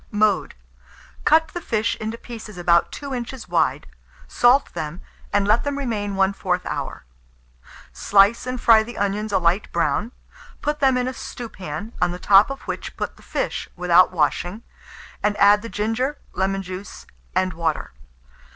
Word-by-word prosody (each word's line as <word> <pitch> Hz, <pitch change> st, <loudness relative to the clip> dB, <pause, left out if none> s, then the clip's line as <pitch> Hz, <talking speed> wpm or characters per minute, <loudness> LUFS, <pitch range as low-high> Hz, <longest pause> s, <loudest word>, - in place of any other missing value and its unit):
Mode. 210 Hz, -2 st, +1 dB, 0.7 s
Cut 320 Hz, +1 st, +4 dB
the 350 Hz, -, -6 dB
fish 225 Hz, -6 st, 0 dB
into 220 Hz, +1 st, -4 dB
pieces 225 Hz, -5 st, -9 dB
about 170 Hz, -1 st, +3 dB
2 280 Hz, -2 st, -6 dB
inches 245 Hz, +1 st, -5 dB
wide, -, -, +1 dB, 0.4 s
salt 250 Hz, +3 st, +3 dB
them, 155 Hz, +3 st, -5 dB, 0.3 s
and 200 Hz, -1 st, +2 dB
let 215 Hz, +3 st, +3 dB
them 285 Hz, -1 st, -2 dB
remain 210 Hz, -7 st, -2 dB
1/4 190 Hz, -2 st, 0 dB
hour. -, -, -5 dB, 0.9 s
Slice 205 Hz, +5 st, +3 dB
and 255 Hz, 0 st, -3 dB
fry 225 Hz, -2 st, +6 dB
the 240 Hz, +2 st, -8 dB
onions 205 Hz, +2 st, -1 dB
a -, -, +3 dB
light 180 Hz, +3 st, +1 dB
brown; 225 Hz, +4 st, 0 dB, 0.5 s
put 295 Hz, 0 st, -2 dB
them 265 Hz, -2 st, +3 dB
in 250 Hz, 0 st, 0 dB
a 260 Hz, -, -3 dB
stewpan, 210 Hz, -5 st, -7 dB
on 180 Hz, -, +3 dB
the 175 Hz, -, -5 dB
top 195 Hz, +4 st, +5 dB
of 275 Hz, -, -6 dB
which -, -, -6 dB
put -, -, -4 dB
the -, -, -19 dB
fish -, -, -3 dB
without 180 Hz, 0 st, +4 dB
washing, 175 Hz, +5 st, -1 dB, 0.6 s
and 210 Hz, 0 st, 0 dB
add 205 Hz, +1 st, +6 dB
the 230 Hz, -, -7 dB
ginger, 225 Hz, +8 st, -1 dB, 0.2 s
lemon 195 Hz, 0 st, -1 dB
juice, 185 Hz, +1 st, -8 dB, 0.3 s
and 185 Hz, 0 st, +1 dB
water. 160 Hz, -1 st, -2 dB
210 Hz, 160 wpm, -22 LUFS, 185-240 Hz, 0.9 s, fry